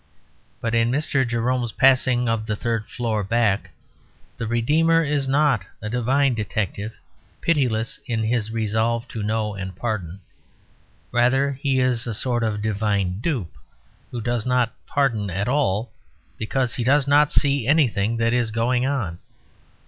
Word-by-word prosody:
But 115 -1 -2
in 115 0 +3
Mr. 135 -1 +1
Jerome's 120 0 0
Passing 130 -2 +4
of 115 -1 -1
the 105 - -1
Third 115 0 -2
Floor 110 -3 -2
Back 110 -1 +1 0.7
the 115 - -4
redeemer 155 +9 +3
is 145 -2 -1
not 135 -6 +2 0.2
a 105 +1 -5
divine 130 +3 +2
detective, 105 0 -3 0.5
pitiless 125 -9 0
in 115 -2 -1
his 110 -1 0
resolve 115 +2 -1
to 110 - -5
know 105 0 -1
and 95 -2 -6
pardon. 100 -4 -4 0.9
Rather 130 +3 +3
he 135 -2 +1
is 125 -1 +1
a 115 - -3
sort 120 +1 0
of 105 -2 -1
divine 100 -3 0
dupe, 120 - -2 0.5
who 120 - -5
does 120 0 -1
not 125 -1 +1
pardon 115 -8 0
at 95 +3 -2
all, 120 -5 0 0.5
because 120 +2 -1
he 120 - -2
does 140 +3 +3
not 145 +1 +4
see 140 -4 +2
anything 115 -7 +2
that 115 0 +1
is 120 -2 +1
going 120 +3 +1
on. 110 -12 -2
115 Hz, 150 wpm, -23 LUFS, 110-130 Hz, 0.9 s, Passing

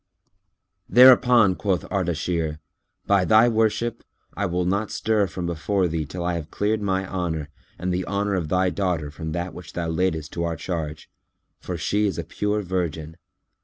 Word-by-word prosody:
Thereupon 125 -3 +7
quoth 95 -1 -1
Ardashir, 85 -4 -1 0.5
"By 100 -2 +3
thy 110 +4 +5
worship, 115 0 0 0.3
I 100 +1 -1
will 90 0 -1
not 100 +3 0
stir 105 -2 +1
from 90 0 -5
before 90 +3 0
thee 80 -3 -3
till 85 +3 -5
I 90 - 0
have 80 -3 -5
cleared 105 +1 -1
my 95 -1 -1
honour 80 -6 -3 0.3
and 90 +1 -2
the 90 0 -2
honour 100 0 -1
of 85 -5 -1
thy 90 +1 +2
daughter 90 -7 -1
from 80 +2 -6
that 85 +1 -3
which 90 - -10
thou 85 -1 -2
laidest 80 -2 -1
to 85 - -2
our 85 -1 -1
charge; 80 -2 -5 0.5
for 90 - -5
she 105 +5 +1
is 95 - -3
a 85 - -2
pure 105 +5 -2
virgin. 85 -4 -3
90 Hz, 170 wpm, -24 LUFS, 85-100 Hz, 0.5 s, Thereupon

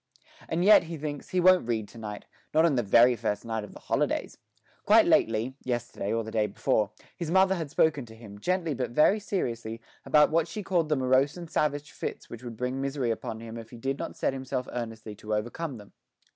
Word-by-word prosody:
And 170 +3 0
yet, 210 -4 +7
he 165 0 -6
thinks, 145 -1 -5
he 185 -1 0
won't 180 -7 +5
read 110 -3 -1
to 115 - -12
night 105 -2 -7 0.3
not 160 +1 +6
on 165 - +3
the 125 - +2
very 120 +3 +5
first 105 -1 -2
night 110 -1 -2
of 105 - -10
the - - -11
holidays. - - -1 0.4
Quite - - +6
lately 115 +3 +2
yesterday 120 -5 -3
or 115 0 0
the 110 - -7
day 110 -1 +1
before 105 +1 0 0.3
his 170 -3 -4
mother 190 +2 +4
had 165 -5 -3
spoken 145 -4 +1
to 110 - -13
him, 105 -3 -12
gently 175 - 0
but 125 -1 -2
very 155 - +4
seriously, 115 - -3 0.2
about 150 0 +4
what 165 0 +2
she 205 +5 -6
called 175 -4 +1
the 150 - +3
morose 130 +3 +2
and 170 -2 -9
savage 145 -1 0
fits - - -6
which 115 - -8
would 120 -2 -7
bring 125 +2 -2
misery 135 -3 -1
upon 110 0 -5
him 115 0 -7
if 115 - -10
he 120 - -11
did 135 +4 -3
not - - -5
set - - 0
himself 130 -1 -3
earnestly 115 -3 -5
to 105 0 -3
overcome 120 +6 -3
them. 105 -1 -14
130 Hz, 220 wpm, -28 LUFS, 115-160 Hz, 0.4 s, yet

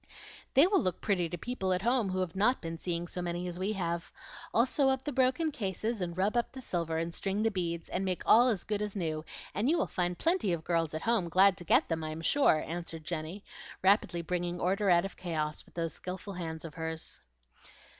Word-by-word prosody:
"They 275 +5 +8
will 390 +2 +3
look 185 -2 -1
pretty 180 -5 0
to 175 - -4
people 210 -5 -2
at 180 +1 -1
home 240 -3 +2
who 185 0 -1
have 180 -2 -3
not 220 +7 +3
been 165 -1 -6
seeing 175 0 -2
so 180 - -4
many 175 +1 -3
as 175 0 -5
we 195 +3 0
have. 170 -3 -3 0.4
I'll 230 - +4
sew 270 +1 +2
up 265 0 0
the 295 - -2
broken 265 +4 +2
cases, 215 - -2
and 175 -1 -3
rub 200 +5 +1
up 240 - +1
the 260 - -7
silver, 170 -9 -2
and 165 +1 -2
string 200 +4 -1
the 225 - +2
beads, 170 -3 -2
and 185 - -2
make 185 -2 -1
all 240 +3 +7
as 215 -7 +1
good 210 -1 -2
as 210 -1 -3
new, 160 -5 -2 0.3
and 220 +7 +1
you 335 - +4
will - - +2
find 175 -1 -1
plenty 330 - +2
of 165 -2 -3
girls 165 -2 0
at 160 - -4
home 225 -7 +1
glad 190 +3 +5
to 175 - -7
get 240 - +4
them, 165 -1 -2
I 155 - -3
am 155 +1 -5
sure," 165 - +3
answered 165 -1 -5
Jenny, 170 +5 -4 0.4
rapidly 190 -3 +3
bringing 175 +1 -2
order 195 +3 +1
out 175 0 +5
of 195 - -7
chaos 155 -4 -2
with - - -22
those 165 -3 -2
skilful 190 +2 -6
hands 165 -3 -5
of 160 - -7
hers. 160 -1 -4
180 Hz, 235 wpm, -31 LUFS, 170-215 Hz, 0.4 s, They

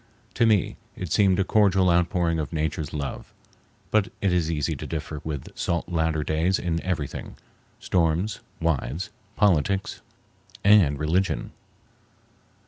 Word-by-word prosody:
To 115 - +3
me 105 -5 +2 0.2
it 90 -4 -6
seemed 95 -2 +4
a 95 - +3
cordial 95 -3 +3
outpouring 85 -1 +1
of 75 - -3
Nature's 80 -2 -2
love; 70 -3 -5 0.6
but 110 -2 +3
it 95 -3 +1
is 85 -3 +1
easy 75 -3 -1
to - - -6
differ 75 -2 -5
with 75 -4 -6
salt 85 0 -2
Latter 80 -2 0
Days 80 +5 +1
in 85 -1 -2
everything—storms, 85 +2 -2 0.2
wives, 80 +1 -1 0.3
politics, 95 -1 +1 0.6
and 95 -9 +5
religion. 85 +6 0
85 Hz, 125 wpm, -25 LUFS, 80-95 Hz, 0.6 s, and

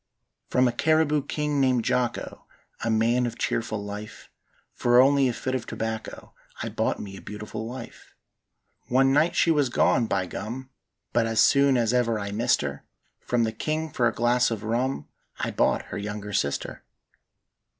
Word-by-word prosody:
"From 125 0 +3
a - - +1
Cariboo 155 0 +2
king 150 -2 -1
named 125 -3 +2
Jocko, 125 -1 -2 0.4
A 115 - 0
man 115 +3 +2
of 115 0 -6
cheerful 110 -2 -2
life, 105 +1 -8 0.4
For 120 0 +3
only 135 +1 +5
a - - +1
fid 130 +2 -3
of 130 -3 -3
tobacco 110 0 -5 0.3
I - - -3
bought - - -1
me 95 -1 -7
a - - -10
beautiful 105 +2 -6
wife. 125 0 -10 0.7
"One 135 +2 +3
night 155 +4 +3
she 165 - +4
was 145 -5 +2
gone, 120 -1 +2
by 95 -3 0
gum! 120 +8 -6 0.4
But 115 -1 +2
as 115 -1 0
soon 140 -1 +5
as 115 -1 +1
ever 120 -2 +2
I 100 -1 -4
missed 120 +4 +2
her, 70 0 -5 0.4
From 120 -1 0
the 110 - 0
king 155 +7 -3
for 120 -2 +2
a - - +1
glass 120 +2 +2
of 115 -2 -4
rum 120 +5 -1 0.3
I - - -2
bought - - +1
her - - -3
younger 105 0 -5
sister. 70 -6 -2
120 Hz, 170 wpm, -26 LUFS, 110-130 Hz, 0.7 s, only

